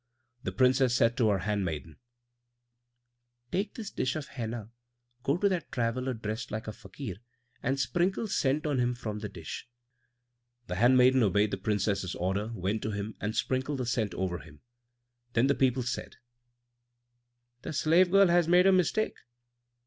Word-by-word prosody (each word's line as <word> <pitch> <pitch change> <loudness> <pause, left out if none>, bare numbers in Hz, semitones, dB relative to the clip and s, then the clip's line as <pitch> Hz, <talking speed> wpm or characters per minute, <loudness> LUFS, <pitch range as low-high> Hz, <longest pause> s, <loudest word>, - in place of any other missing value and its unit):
The - - -3
Princess 130 -1 +3
said 115 -1 +3
to 115 -4 +3
her 100 - +3
handmaiden, 90 -6 -3 1.5
"Take 200 +2 -1
this 215 -4 -6
dish 130 - -1
of 150 -2 -5
henna, 115 -4 -5 0.5
go 140 +5 +1
to 200 - +2
that 185 -4 -2
traveller 125 0 -1
dressed 110 +1 -4
like 110 +1 -5
a - - -2
Fakir, 105 -1 -8 0.4
and 135 +2 0
sprinkle 175 - 0
scent 150 -6 0
on 145 -4 +1
him 125 0 +1
from 105 -3 -5
the 105 -1 -5
dish." 85 +7 -8 1.0
The 90 - -4
handmaiden 125 +3 +5
obeyed 105 0 +3
the - - -1
Princess's 100 -2 -1
order, 95 +4 -1
went 100 +3 -1
to 110 - -2
him, 105 +1 -4
and 105 +1 -2
sprinkled 130 +2 -1
the 130 - -2
scent 115 -3 -1
over 90 -2 -2
him. 75 +1 -15 0.7
Then 115 +2 +3
the 140 - +4
people 130 -2 +1
said, 125 - -4 1.5
"The - - -5
slave 165 +4 +4
girl 195 0 +6
has 175 -1 +4
made 180 +2 +5
a 195 - +7
mistake." 185 +4 +1
120 Hz, 160 wpm, -29 LUFS, 105-140 Hz, 1.5 s, a